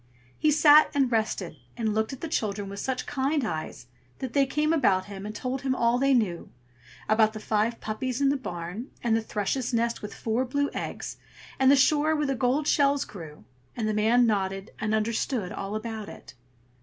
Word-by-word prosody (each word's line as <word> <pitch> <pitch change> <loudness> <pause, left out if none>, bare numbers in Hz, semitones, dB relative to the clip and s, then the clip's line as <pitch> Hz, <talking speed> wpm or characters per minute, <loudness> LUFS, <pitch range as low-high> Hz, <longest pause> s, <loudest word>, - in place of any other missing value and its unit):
He 310 - +3
sat 300 0 +7
and 270 -3 +2
rested, 210 -7 -1 0.2
and 220 -2 0
looked 220 +2 0
at 270 - -8
the 330 - -3
children 205 -9 -2
with 200 0 -7
such 260 +2 -2
kind 275 0 0
eyes 155 - -5 0.3
that 260 -3 -5
they 275 -1 +3
came 300 +4 +1
about 200 -12 +2
him, 200 0 -7
and 210 - -7
told 255 +3 -3
him 265 -1 0
all 235 0 +2
they 275 0 +3
knew; 190 -8 -1 0.6
about 215 0 +3
the 215 - -6
five 220 +2 0
puppies 245 +4 -3
in 280 -1 +3
the 280 - +2
barn, 180 0 -6
and 235 -2 +2
the 225 - +1
thrush's 225 +4 -2
nest 235 0 0
with 210 - -7
four 230 +3 -1
blue 285 +3 -1
eggs, - - -5 0.4
and 265 0 +5
the 280 - +7
shore 300 +3 +3
where 300 -1 0
the 275 - 0
gold 265 +4 0
shells 280 -1 +3
grew; 160 -6 -11 0.3
and 220 -2 -1
the 215 - 0
man 225 +4 +4
nodded 195 -2 -1
and 215 0 0
understood 220 -1 -1
all 200 +2 -5
about 220 -1 -5
it. 135 - -12
230 Hz, 200 wpm, -27 LUFS, 210-270 Hz, 0.6 s, sat